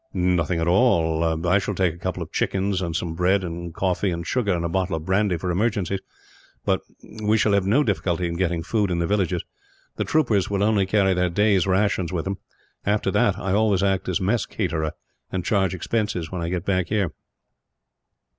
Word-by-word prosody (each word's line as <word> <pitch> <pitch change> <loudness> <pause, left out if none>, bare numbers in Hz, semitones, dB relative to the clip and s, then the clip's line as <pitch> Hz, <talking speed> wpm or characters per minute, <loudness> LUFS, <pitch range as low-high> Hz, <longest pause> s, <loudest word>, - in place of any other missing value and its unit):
"Nothing 90 -2 +1
at 80 - 0
all. 85 -5 +2
I 95 +3 +4
shall 100 +1 -3
take 90 -3 +1
a - - -13
couple - - -3
of - - -12
chickens, 95 0 0
and 85 -3 -3
some 80 0 -2
bread 95 +3 +2
and 85 0 -5
coffee 95 +3 0
and 85 -1 -3
sugar, 110 0 0
and 85 -2 0
a - - +1
bottle 95 0 -1
of 80 -1 -5
brandy 95 -1 +1
for 90 +2 -2
emergencies; 100 -1 0 0.7
but - - +1 0.4
we 105 +1 +3
shall 105 -2 +2
have 100 -1 +2
no 135 +9 +4
difficulty 90 - 0
in 85 - -3
getting 85 -2 -1
food 105 +1 0
in 90 - 0
the 85 - 0
villages. 95 -3 0 0.5
The - - 0
troopers 120 -11 +1
will 100 -1 0
only 105 -3 +2
carry 95 -1 +3
their 90 0 +1
day's 100 0 +2
rations 95 -2 +1
with 85 -3 -2
them. 95 0 -3 0.4
After 105 -1 +1
that 100 +1 +2
I 95 -2 -2
always 105 -2 +2
act 95 -2 0
as 90 - 0
mess 100 +4 0
caterer, 80 -1 -2 0.4
and 90 -2 -3
charge 95 -3 +1
expenses 95 -3 -2
when 90 -2 -4
I 85 - -2
get 90 0 -3
back 95 -3 +1
here." 100 -5 0
95 Hz, 200 wpm, -23 LUFS, 85-100 Hz, 0.7 s, I